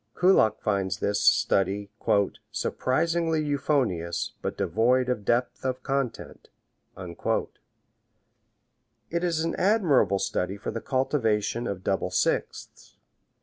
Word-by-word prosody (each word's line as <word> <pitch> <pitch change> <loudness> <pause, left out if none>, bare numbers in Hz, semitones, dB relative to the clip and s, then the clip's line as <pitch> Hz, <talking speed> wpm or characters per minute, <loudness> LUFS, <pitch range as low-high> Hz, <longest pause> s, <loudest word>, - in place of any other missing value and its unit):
Kullak 180 - +4
finds 95 -3 -1
this 100 0 -1
study 100 +1 +2 0.6
"surprisingly 165 +4 0
euphonious, 125 - -1
but - - -4
devoid 125 +3 +2
of 125 -5 -1
depth 120 +4 0
of 130 -1 -3
content." 135 -3 -3 0.5
It 85 -2 -3 1.7
is 165 -3 0
an 165 - -1
admirable 180 - +3
study 95 0 -2
for 100 - -5
the 115 +1 -5
cultivation 120 -4 0
of 95 -2 -5
double 95 -1 0
sixths. 90 - -2
120 Hz, 105 wpm, -26 LUFS, 100-140 Hz, 1.7 s, Kullak